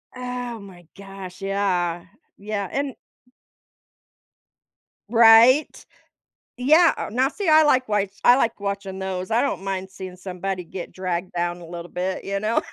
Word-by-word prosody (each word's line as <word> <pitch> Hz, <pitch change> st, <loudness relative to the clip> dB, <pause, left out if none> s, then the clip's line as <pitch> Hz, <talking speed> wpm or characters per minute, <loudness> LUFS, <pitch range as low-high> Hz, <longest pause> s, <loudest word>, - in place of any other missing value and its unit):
Oh 250 Hz, -2 st, -5 dB
my 185 Hz, -4 st, -14 dB
gosh, 195 Hz, -1 st, -10 dB
yeah. 180 Hz, -4 st, -1 dB, 0.3 s
Yeah, 200 Hz, -2 st, -4 dB
and 275 Hz, -2 st, -2 dB, 2.1 s
Right? 235 Hz, +5 st, +6 dB, 0.7 s
Yeah, 310 Hz, +7 st, +5 dB
o -, -, -4 dB
now 255 Hz, +4 st, +2 dB
see, 390 Hz, +3 st, -4 dB
I 310 Hz, 0 st, +7 dB
like 255 Hz, -5 st, +2 dB
wa 205 Hz, -1 st, +1 dB, 0.2 s
I 245 Hz, -, +8 dB
like 230 Hz, -5 st, 0 dB
watching 200 Hz, -1 st, -4 dB
those, 190 Hz, +1 st, -4 dB
I 230 Hz, +2 st, +3 dB
don't 275 Hz, -8 st, -2 dB
mind 190 Hz, -1 st, -4 dB
seeing 185 Hz, -1 st, -9 dB
somebody 185 Hz, 0 st, -5 dB
get 175 Hz, +1 st, -8 dB
dragged 180 Hz, -1 st, -4 dB
down 175 Hz, 0 st, -2 dB
a 170 Hz, -, -11 dB
little 170 Hz, 0 st, -8 dB
bit, 185 Hz, +1 st, -3 dB
you 195 Hz, 0 st, -2 dB
know? 215 Hz, +2 st, +1 dB
195 Hz, 145 wpm, -23 LUFS, 185-240 Hz, 2.1 s, I